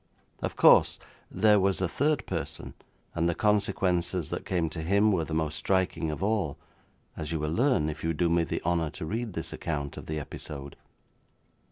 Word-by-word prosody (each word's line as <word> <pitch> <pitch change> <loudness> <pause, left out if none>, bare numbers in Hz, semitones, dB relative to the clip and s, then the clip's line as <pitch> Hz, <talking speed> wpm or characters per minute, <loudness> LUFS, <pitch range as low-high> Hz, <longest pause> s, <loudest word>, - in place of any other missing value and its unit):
Of - - -3
course, - - +6 0.3
there 105 -1 +4
was 95 0 +2
a 95 - +1
third 150 - 0
person, - - -4 0.4
and 85 0 +1
the 85 - 0
consequences 95 -5 +1
that - - -4
came 85 -3 +1
to 80 - -5
him 100 +6 +3
were 85 -5 +1
the 80 - -4
most 80 -1 -1
striking 95 -2 0
of 75 +5 -4
all, 100 -9 0 0.6
as 80 0 -5
you 80 - 0
will 75 +1 -2
learn 125 - +2
if 80 0 -5
you 80 - +1
do 85 +2 +1
me 85 0 +3
the - - -3
honour 85 -2 +1
to - - -4
read 110 +4 -3
this 80 - -4
account 70 -1 -4
of - - -8
the 80 0 -2
episode. 70 -1 -7
85 Hz, 190 wpm, -28 LUFS, 80-100 Hz, 0.6 s, course